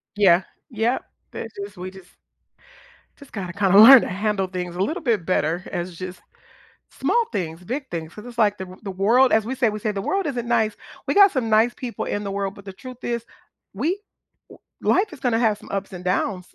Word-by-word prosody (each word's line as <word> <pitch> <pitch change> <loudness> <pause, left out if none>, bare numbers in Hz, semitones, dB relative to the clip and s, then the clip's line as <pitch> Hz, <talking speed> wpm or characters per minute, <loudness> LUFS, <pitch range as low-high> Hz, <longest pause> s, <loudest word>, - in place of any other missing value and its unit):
Yeah, 185 -3 +5 0.3
yeah, 235 +1 0 0.3
that - - -6
just 200 -1 -8
we 185 +1 -6
just 190 -2 -15 1.1
just 280 - -15
gotta 185 -5 -5
kinda 195 0 +3
learn 245 +3 +11
to - - -3
handle 195 0 -1
things 180 -1 -5
a - - -4
little 315 - -1
bit 220 -9 0
better 175 -1 0
as 175 0 -4
just 185 +1 -7 0.7
small 475 -1 +1
things, 175 -4 -4
big 265 +8 -4
things, 165 -1 -5
'cause 210 +2 -11
it's 240 -1 -11
like 210 -2 +3
the 185 0 -8
the 195 - -4
world 230 +8 +4
as 220 -1 +3
we 260 - -3
say, 240 -3 +2
we 210 0 -5
say 215 0 -1
"The 195 -1 -4
world 390 - -1
isn't 240 -4 -3
nice. 220 -3 +1 0.3
We - - +1
got 400 -1 +7
some 250 -6 -1
nice 220 +3 +4
people 245 -2 -5
in 205 - -3
the 200 - -4
world, 195 0 -3
but 200 - -14
the 195 - -8
truth 255 +5 -11
is, 235 -1 -2 0.5
we 330 - -1 0.8
w - - +3
life 425 -4 -3
is 285 - -11
gonna 240 -4 +1
have 215 -3 +2
some - - -15
ups 195 0 -3
and 180 0 -8
downs." 180 0 -2
205 Hz, 220 wpm, -23 LUFS, 185-240 Hz, 1.1 s, learn